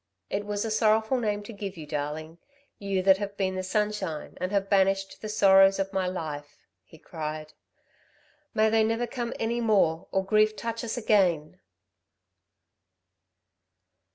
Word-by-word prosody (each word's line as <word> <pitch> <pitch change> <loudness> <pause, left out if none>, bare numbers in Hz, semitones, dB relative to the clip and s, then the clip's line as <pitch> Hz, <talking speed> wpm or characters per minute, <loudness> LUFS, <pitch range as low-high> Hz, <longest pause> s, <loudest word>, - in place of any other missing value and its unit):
"It 205 +1 -2
was 205 +1 -2
a 225 - -3
sorrowful 220 +3 +2
name 210 -3 -1
to 230 - -9
give 200 -2 -6
you, 155 - -7
darling, 150 +3 -5 0.4
you 195 -2 -1
that 190 0 +6
have 200 -1 -5
been 190 -1 0
the 185 - -3
sunshine, 190 -4 -2
and 185 +1 -2
have 200 -1 0
banished 195 -1 +1
the 215 - -5
sorrows 195 -2 +5
of 195 0 -2
my 190 -1 0
life," 145 -5 -5 0.3
he 160 - -17
cried. 155 -1 -6 1.0
"May 215 0 +3
they 225 0 +4
never 225 +2 0
come 240 0 -4
any 235 +1 -1
more 190 -7 +2
or 190 0 0
grief 215 +1 +3
touch 230 +1 -4
us 235 +1 -3
again!" 185 -9 +1
195 Hz, 155 wpm, -27 LUFS, 180-215 Hz, 1.0 s, that